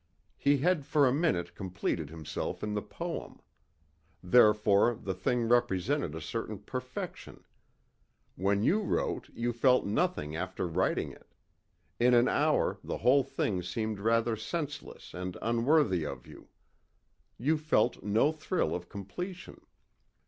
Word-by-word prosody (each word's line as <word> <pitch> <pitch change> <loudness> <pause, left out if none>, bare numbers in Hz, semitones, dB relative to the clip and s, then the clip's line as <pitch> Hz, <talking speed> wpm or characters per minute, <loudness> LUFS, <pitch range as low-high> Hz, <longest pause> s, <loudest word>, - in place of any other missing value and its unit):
He 140 0 +3
had 165 +2 +1
for 145 0 +3
a 125 - +2
minute 95 - 0
completed 90 -5 -3
himself 80 -1 -5
in 105 0 -2
the 105 - -1
poem. - - -6 0.8
Therefore 105 +2 +5
the 95 -3 -4
thing 120 +6 0
represented 120 - +1
a 80 - -6
certain 110 +4 -4
perfection. 125 +5 -7 0.9
When 100 +2 +1
you 205 - +3
wrote 200 - -1
you 120 +1 -2
felt 125 +2 +3
nothing 100 - -1
after 85 - -3
writing 90 +3 0
it. - - -19 0.6
In 125 +1 +5
an 120 +1 +5
hour 150 +2 +2
the - - -3
whole 135 +3 +4
thing 105 -7 -2
seemed 105 +4 -3
rather 115 +2 +2
senseless 145 +6 -6
and 90 +1 -5
unworthy 115 - +2
of 70 -4 -6
you. - - -14 0.9
You 150 +6 +1
felt 150 -8 +1
no 110 +8 +2
thrill 160 +3 -1
of 90 0 -5
completion. 175 - -7
115 Hz, 135 wpm, -30 LUFS, 95-140 Hz, 0.9 s, Therefore